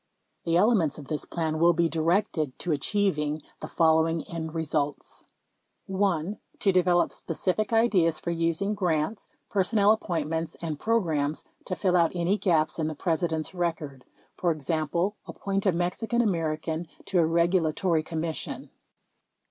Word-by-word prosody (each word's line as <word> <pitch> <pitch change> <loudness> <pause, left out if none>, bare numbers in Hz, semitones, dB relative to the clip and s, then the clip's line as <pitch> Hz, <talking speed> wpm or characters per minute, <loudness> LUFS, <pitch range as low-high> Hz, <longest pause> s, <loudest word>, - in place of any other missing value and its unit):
The 165 0 +2
elements 195 - +3
of 145 -3 -10
this 155 -2 -2
plan 160 -2 -2
will 170 +1 +5
be 170 0 +2
directed 165 -3 0
to 175 - -3
achieving 150 -2 0 0.2
the - - -6
following 160 0 +2
end 160 -1 -6
results: 150 -3 -2 0.6
1. 190 -1 0 0.2
To 195 - +2
develop 180 -1 +3
specific 185 +6 -2
ideas 195 -8 +3
for 170 - -3
using 170 +4 0
grants, 180 0 -1 0.2
personnel 205 +1 +3
appointments 165 -5 -1
and 155 -3 -5
programs 160 -10 0 0.2
to 185 - -3
fill 185 -2 +1
out 170 -2 +3
any 175 +3 +1
gaps 160 -4 +1
in 155 - 0
the 155 - -4
Presi 170 +2 0
dent's 160 +2 -3
record, 160 -7 -3 0.4
e.g., 155 -2 0 0.4
appoint 195 0 -2
a - - +5
Mexican 180 +8 0
American 160 -3 -1 0.2
to 185 - +1
a 165 - +5
regula 170 0 +2
tory 170 -1 +1
commission. 160 0 -4
170 Hz, 140 wpm, -27 LUFS, 155-185 Hz, 0.6 s, will